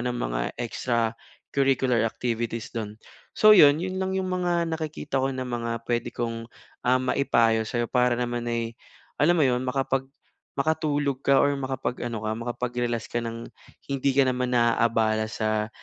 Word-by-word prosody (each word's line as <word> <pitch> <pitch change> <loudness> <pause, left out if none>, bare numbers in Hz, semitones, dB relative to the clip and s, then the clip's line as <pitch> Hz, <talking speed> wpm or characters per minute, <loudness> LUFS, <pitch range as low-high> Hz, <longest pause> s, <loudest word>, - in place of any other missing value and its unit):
ng 125 - -2
mga - - -2 0.2
extra 115 -1 -1 0.4
curricular 130 -3 +2
activities 115 -1 -3
doon 110 -2 -5 0.4
so, 215 0 +8
iyon 145 -8 +8
iyon 185 0 -4
lang 190 0 -1
yung 190 -1 -1
mga 175 -2 +1
nakikita 155 -4 -3
ko 135 - +1
na 130 -1 -3
mga 115 -2 -3
pwede 120 0 -1
kong, 115 -1 -4 0.4
ah, 125 - +5
maipayo 115 -4 +2
sayo 120 -1 -1
para 125 0 +2
naman 120 -1 -2
ay 115 -1 -2 0.5
alam 175 +4 +4
mo 155 - +4
iyon 125 -1 +2
makapag 135 +1 -1 0.5
makatulog 145 -2 0
ka 140 -1 +3
or 145 - +4
makapag-ano 120 -4 -3
ka 110 - -1
makapag-relax 120 0 -3
ka 120 - 0
ng 115 0 -5 0.5
hindi 140 0 +1
ka 140 - +6
naman 125 -1 0
na-aabala 115 -2 +2
sa 110 -1 -1
125 Hz, 155 wpm, -26 LUFS, 115-135 Hz, 0.5 s, so